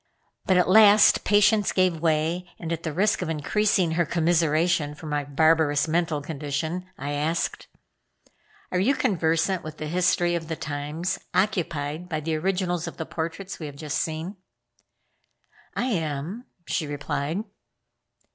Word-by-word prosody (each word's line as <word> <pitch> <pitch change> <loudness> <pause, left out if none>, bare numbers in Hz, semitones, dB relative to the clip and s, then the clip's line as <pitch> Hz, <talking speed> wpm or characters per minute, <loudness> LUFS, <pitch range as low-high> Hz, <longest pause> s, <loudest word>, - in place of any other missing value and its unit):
But 185 -2 +4
at 180 - +3
last 210 +2 +7
patience 210 +1 +4
gave 185 -3 +2
way 165 +2 0
and, 165 -1 -4
at 165 - -4
the 160 - -3
risk 200 +7 +1
of 180 - -3
increasing 180 +3 +1
her 170 +2 +2
commiseration 165 -1 +1
for 160 - -12
my 150 -1 -1
barbarous 150 +1 +2
mental 160 -2 0
condition, 155 +4 -4
I 145 +2 -4
asked: 155 +4 -2 1.0
"Are 180 - +1
you 250 +10 +3
conversant 175 -5 +1
with 155 0 -8
the 155 - -5
history 175 +1 +1
of 165 -2 -3
the 160 - -3
times 150 +4 -3 0.2
occupied 170 -4 -1
by 155 -3 -2
the 160 +1 -2
originals 180 0 -1
of - - -8
the 160 - -4
portraits 170 +5 -5
we 155 - -5
have 145 - -9
just 150 0 -3
seen?" 165 +5 -4 1.4
"I - - 0
am," 170 - -3 0.2
she 155 - -2
replied. 145 +5 -3
165 Hz, 145 wpm, -25 LUFS, 155-180 Hz, 1.4 s, last